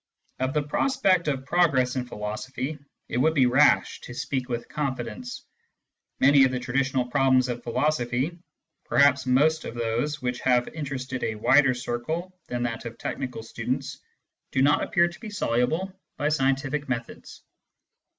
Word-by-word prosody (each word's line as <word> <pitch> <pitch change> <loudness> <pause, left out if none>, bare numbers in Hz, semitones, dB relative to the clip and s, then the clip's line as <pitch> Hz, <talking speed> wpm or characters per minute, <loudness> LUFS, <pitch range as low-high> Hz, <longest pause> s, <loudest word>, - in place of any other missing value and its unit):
Of 130 +2 -1
the 150 - +2
prospect 190 - +1
of 135 -2 -1
progress 140 -6 +2
in 125 -1 -2
philosophy, 125 +7 -5 0.3
it - - -3
would 160 +4 +3
be 135 -3 +5
rash 130 +4 +3
to 120 - -9
speak 130 0 -3
with 120 -1 -3
confidence. 150 - -4 0.7
Many 140 0 +6
of 130 - +5
the 130 0 -2
traditional 130 0 0
problems 130 -1 +3
of 120 0 -3
philosophy, 130 +4 -1 0.5
perhaps 140 -2 +4
most 155 +5 +3
of - - -7
those 120 +6 -1
which 125 -2 -2
have 125 -1 +2
interested 130 -4 -5
a 110 - -1
wider 130 +4 +4
circle 155 +10 -4
than 120 0 -2
that 115 -1 -3
of 115 0 -7
technical 125 -4 -5
students, 125 +4 -4 0.5
do 130 - +1
not 145 +1 +4
appear 175 -1 +3
to 175 - -10
be 220 - -7
soluble 160 - 0 0.2
by 145 - 0
scientific 135 0 0
methods. 115 -2 -6
130 Hz, 150 wpm, -26 LUFS, 125-150 Hz, 0.7 s, Many